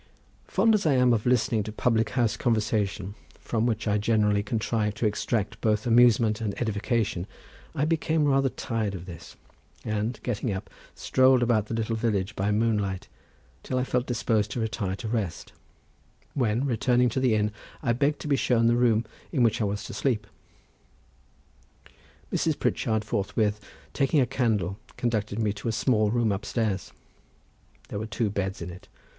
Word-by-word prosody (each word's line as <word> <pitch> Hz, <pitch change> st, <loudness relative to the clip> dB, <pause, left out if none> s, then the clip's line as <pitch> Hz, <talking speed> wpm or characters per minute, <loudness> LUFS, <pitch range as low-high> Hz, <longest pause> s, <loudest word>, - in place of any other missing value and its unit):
Fond 220 Hz, +4 st, +3 dB
as 205 Hz, -6 st, +2 dB
I 145 Hz, -, +4 dB
am 125 Hz, -1 st, +4 dB
of 110 Hz, +1 st, 0 dB
listening 120 Hz, -2 st, +2 dB
to 105 Hz, +1 st, -5 dB
public 115 Hz, 0 st, +1 dB
house 115 Hz, -4 st, +2 dB
conversation, 105 Hz, -4 st, 0 dB, 0.3 s
from 115 Hz, 0 st, -1 dB
which 115 Hz, -1 st, -1 dB
I 105 Hz, 0 st, +2 dB
generally 105 Hz, -1 st, +2 dB
contrive 105 Hz, 0 st, -1 dB
to 110 Hz, -, -2 dB
extract 105 Hz, 0 st, -1 dB
both 110 Hz, -1 st, +1 dB
amusement 115 Hz, -2 st, +4 dB
and 105 Hz, -3 st, -3 dB
edification, 110 Hz, -4 st, -1 dB, 0.5 s
I 145 Hz, -, +1 dB
became 160 Hz, -1 st, +1 dB
rather 135 Hz, -1 st, +3 dB
tired 110 Hz, -5 st, -3 dB
of 90 Hz, -1 st, -7 dB
this, 85 Hz, -4 st, -10 dB, 0.5 s
and 110 Hz, +2 st, -2 dB
getting 120 Hz, -1 st, -2 dB
up, 95 Hz, +1 st, -5 dB, 0.2 s
strolled 130 Hz, -1 st, +4 dB
about 110 Hz, -3 st, +2 dB
the 115 Hz, -, -3 dB
little 115 Hz, 0 st, -1 dB
village 110 Hz, -4 st, -1 dB
by 100 Hz, +2 st, 0 dB
moonlight 105 Hz, -3 st, 0 dB, 0.5 s
till 130 Hz, -, -3 dB
I 125 Hz, -, +1 dB
felt 125 Hz, -1 st, -1 dB
disposed 110 Hz, -3 st, 0 dB
to -, -, -3 dB
retire 105 Hz, -4 st, -2 dB
to 110 Hz, -, -6 dB
rest, 105 Hz, -7 st, -3 dB, 0.8 s
when 120 Hz, 0 st, +1 dB
returning 125 Hz, 0 st, +2 dB
to 125 Hz, -, -1 dB
the 125 Hz, -4 st, +3 dB
inn, 105 Hz, 0 st, +1 dB, 0.3 s
I 115 Hz, -, +2 dB
begged 140 Hz, +4 st, +1 dB
to -, -, -5 dB
be 145 Hz, -, +3 dB
shown 120 Hz, -3 st, +2 dB
the 120 Hz, +1 st, +4 dB
room 120 Hz, -2 st, +3 dB, 0.3 s
in 135 Hz, -7 st, +2 dB
which 115 Hz, -1 st, +2 dB
I -, -, +2 dB
was 100 Hz, 0 st, -2 dB
to -, -, -7 dB
sleep. 105 Hz, 0 st, 0 dB, 2.1 s
Mrs. -, -, +1 dB
Pritchard 110 Hz, -1 st, 0 dB
forthwith 105 Hz, +1 st, 0 dB, 0.3 s
taking 140 Hz, +2 st, +2 dB
a 130 Hz, -, +4 dB
candle 110 Hz, -7 st, 0 dB, 0.2 s
conducted 110 Hz, -4 st, -1 dB
me 110 Hz, -3 st, +1 dB
to 100 Hz, +3 st, -7 dB
a -, -, +2 dB
small 110 Hz, -1 st, +2 dB
room 115 Hz, -1 st, +1 dB
upstairs. 100 Hz, 0 st, -2 dB, 1.0 s
There 100 Hz, -, -4 dB
were 110 Hz, -, -4 dB
two 110 Hz, -1 st, -1 dB
beds 95 Hz, -1 st, -3 dB
in 90 Hz, -, -6 dB
it. 90 Hz, +3 st, -12 dB
110 Hz, 170 wpm, -27 LUFS, 105-120 Hz, 2.1 s, I